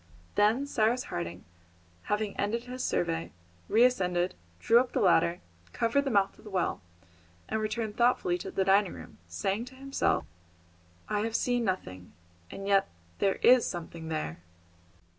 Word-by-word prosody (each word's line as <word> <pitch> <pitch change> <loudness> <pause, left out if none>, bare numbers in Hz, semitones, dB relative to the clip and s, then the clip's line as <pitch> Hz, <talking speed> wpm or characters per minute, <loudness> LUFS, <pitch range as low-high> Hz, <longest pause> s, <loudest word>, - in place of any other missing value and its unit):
Then 220 +7 +3
Cyrus 240 -2 +1
Harding, 85 +1 -5 0.6
having 210 0 -1
ended 225 +4 -1
his 250 +1 -6
survey, 165 -1 -1 0.4
re 230 - +5
ascended, 180 -7 +2 0.3
drew 230 - +5
up 250 0 -1
the - - +1
ladder, 170 -2 +3 0.3
covered 260 +5 +1
the - - 0
mouth 200 -4 +1
of - - -16
the 215 - -10
well, 190 -3 -1 0.7
and 220 - -1
returned 215 0 -3
thoughtfully 235 -7 +2
to - - -6
the 190 - 0
dining 195 0 +3
room, - - -12
saying 195 - -2
to 260 +1 -13
himself, 275 +1 0 0.8
"I 210 - 0
have 225 +1 -2
seen 245 -1 +1
nothing, 95 - -4 0.4
and 195 - -7
yet 195 -1 +4 0.3
there 195 - +2
is 250 0 +6
something 165 -2 -6
there!" 155 - -3
205 Hz, 155 wpm, -29 LUFS, 175-235 Hz, 0.8 s, is